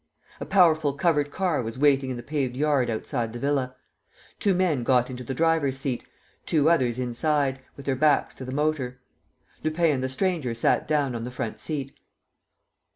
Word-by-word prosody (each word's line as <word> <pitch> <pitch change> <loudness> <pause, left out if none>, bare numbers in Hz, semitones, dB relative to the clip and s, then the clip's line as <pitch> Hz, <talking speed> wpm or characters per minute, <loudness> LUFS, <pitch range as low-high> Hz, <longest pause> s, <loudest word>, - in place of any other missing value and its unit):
A - - -6
powerful 160 -7 +4
covered 145 0 +1
car 175 -1 0
was 115 0 -5
waiting 135 -1 +3
in 125 - -3
the 120 - -7
paved 135 -2 -2
yard 140 -3 +2
outside 115 0 -2
the - - -5
villa. 135 -1 -1 0.6
Two 200 -3 +2
men 175 -8 +1
got 125 +1 +2
into 125 0 -6
the 130 +2 -4
driver's 160 -3 +2
seat, 135 -2 -3 0.4
two 155 0 +3
others 125 -7 +2
inside, 135 +2 0 0.2
with 140 - -10
their 135 - +1
backs 150 +1 +2
to - - -9
the 130 - -6
motor. 135 -3 -1 0.6
Lupin 155 +1 +2
and 130 -3 -1
the 130 - -1
stranger 150 -5 -1
sat 115 - +1
down 145 -4 +1
on 115 -1 -4
the 120 - -4
front 120 -3 -5
seat. 140 -4 -4
140 Hz, 180 wpm, -26 LUFS, 125-155 Hz, 0.6 s, powerful